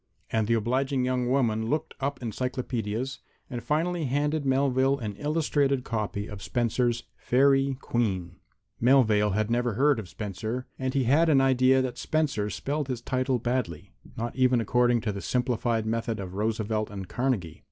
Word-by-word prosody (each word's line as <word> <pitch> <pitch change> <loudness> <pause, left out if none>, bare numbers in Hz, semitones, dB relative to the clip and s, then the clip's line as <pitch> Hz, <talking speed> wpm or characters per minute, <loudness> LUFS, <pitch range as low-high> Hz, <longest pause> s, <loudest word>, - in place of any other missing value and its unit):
And 110 -2 +1
the 115 - +3
obliging 130 +4 0
young 125 -1 0
woman 115 -4 +1
looked 155 +3 -1
up 140 -1 -3
encyclopedias 125 +1 -3 0.3
and 120 -2 -4
finally 165 +2 0
handed 145 +3 0
Melvale 135 0 +2
an 105 -6 -5
illustrated 145 -3 +1
copy 105 -3 -3
of 105 -2 -8
Spenser's 120 +1 0
"Faerie 135 +1 +3
Queene." 95 -10 -2 0.4
Melvale 110 -6 +4
had 110 +1 0
never 120 -2 +1
heard 140 0 +3
of 100 -5 -8
Spenser, 110 +5 -4
and 130 0 -2
he 135 - +3
had 150 +7 +4
an 140 -3 +5
idea 130 0 +4
that 125 -2 -4
Spenser 145 -10 0
spelled 140 - -3
his 125 -3 -3
title 130 0 0
badly, 115 -6 -3 0.2
not 115 +1 -3
even 130 -1 +3
according 120 +1 +2
to 110 - -1
the 100 -1 -5
simplified 120 -3 0
method 115 0 -2
of 95 -2 -6
Roosevelt 110 +1 -1
and 95 -2 -7
Carnegie. 120 - -2
125 Hz, 160 wpm, -27 LUFS, 110-135 Hz, 0.4 s, an